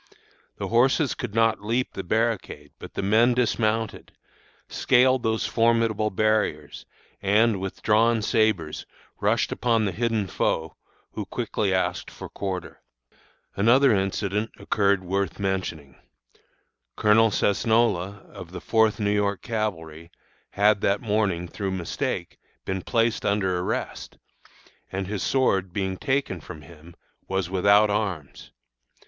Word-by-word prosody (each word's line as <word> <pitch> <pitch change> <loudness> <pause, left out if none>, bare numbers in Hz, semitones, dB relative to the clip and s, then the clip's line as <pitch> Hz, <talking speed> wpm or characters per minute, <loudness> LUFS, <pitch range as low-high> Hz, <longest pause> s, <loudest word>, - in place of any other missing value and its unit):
The - - -4
horses 130 +5 +3
could 120 -5 -6
not 115 -2 +2
leap 120 +4 -1
the 95 - -5
barricade, 105 -8 -2
but - - -11
the - - -2
men 115 +5 +4
dismounted, 115 -2 -1 0.6
scaled 130 0 +3
those 110 -1 0
formidable 115 -2 +2
barriers, 105 -8 -1 0.3
and, 105 +1 +3
with 95 0 -6
drawn 110 +1 +3
sabres, 105 -9 0 0.3
rushed - - +1
upon 115 -3 +1
the 100 - -1
hidden 115 +1 -1
foe, 80 -3 -2 0.4
who - - -5
quickly 100 -3 -2
asked 95 -1 -1
for - - -10
quarter. 95 -2 -5 0.7
"Another 120 +5 +4
incident 100 +2 -1
occurred 100 -2 +1
worth 95 -1 -2
mentioning. 95 -8 -3 1.0
Colonel 110 +1 +4
Cesnola, 105 -2 +1
of 90 0 -11
the 90 - -5
Fourth 110 -1 +2
New 105 -1 +1
York 100 -1 0
Cavalry, 85 - -4 0.4
had 100 0 +2
that 100 +1 +1
morning, 105 -6 0
through 95 +3 -4
mistake, 90 -3 -4 0.3
been 95 0 -2
placed 115 +3 0
under 95 -3 0
arrest, 90 - -4 0.7
and, 95 +1 -3
his 100 0 -4
sword 95 -5 +1
being 95 0 -2
taken 130 - -1
from 80 -1 -10
him, 85 +3 -15 0.3
was 95 -2 -2
without 100 +2 +4
arms. 95 -9 -4
105 Hz, 125 wpm, -25 LUFS, 95-115 Hz, 1.0 s, men